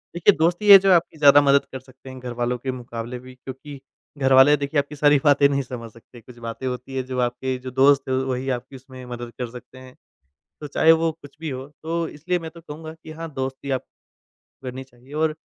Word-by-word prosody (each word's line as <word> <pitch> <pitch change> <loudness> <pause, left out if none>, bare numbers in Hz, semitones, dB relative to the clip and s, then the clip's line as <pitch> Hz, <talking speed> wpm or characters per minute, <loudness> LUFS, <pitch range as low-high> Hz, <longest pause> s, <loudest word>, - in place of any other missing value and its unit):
देखिए 175 - +4
दोस्त 170 +2 +2
ही 210 - 0
है 200 - +13
जो 195 0 +2
आपकी 165 -2 +1
ज़्यादा 145 -1 +7
मदद 140 0 +3
कर 130 - -6
सकते 130 +1 -16
हैं 130 0 -9
घरवालों 120 0 -3
के 130 +2 -4
मुकाबले 120 -1 -7
भी, 130 +1 -13
क्योंकि 135 +2 -10 0.4
घरवाले 135 +1 +6
देखिए 145 +1 -1
आपकी 145 +1 -4
सारी 145 0 +4
बातें 145 -1 +5
नहीं 140 0 0
समझ 120 -3 -8
सकते, 115 +1 -16
कुछ 120 +2 -15
बातें 115 +3 -6
होती 125 +1 -6
हैं, 130 -1 -2
जो 130 -1 -4
आपके 125 +1 -1
जो 130 0 -8
दोस्त 135 +1 +3
हैं 130 - +1
वही 130 0 -2
आपकी 125 +3 -14
उसमें 130 -1 -12
मदद 120 -1 -7
कर 125 -2 -3
सकते 125 +1 -12
हैं। 130 0 -14 0.7
तो 150 - -5
चाहे 160 +3 +4
वो 165 0 +2
कुछ 145 -3 -16
भी 160 -1 -4
हो 130 +1 -6 0.2
तो 165 +1 -2
इसलिए 175 +5 -3
मैं 165 -1 -8
तो 170 0 -14
कहूँगा 160 0 -9
कि 160 -1 -13
हाँ, 165 0 -7
दोस्ती 135 +1 -5
आप 130 - -2 0.8
करनी 130 +1 -6
चाहिए। 130 +1 -19
और 155 0 0
135 Hz, 225 wpm, -23 LUFS, 125-150 Hz, 0.8 s, है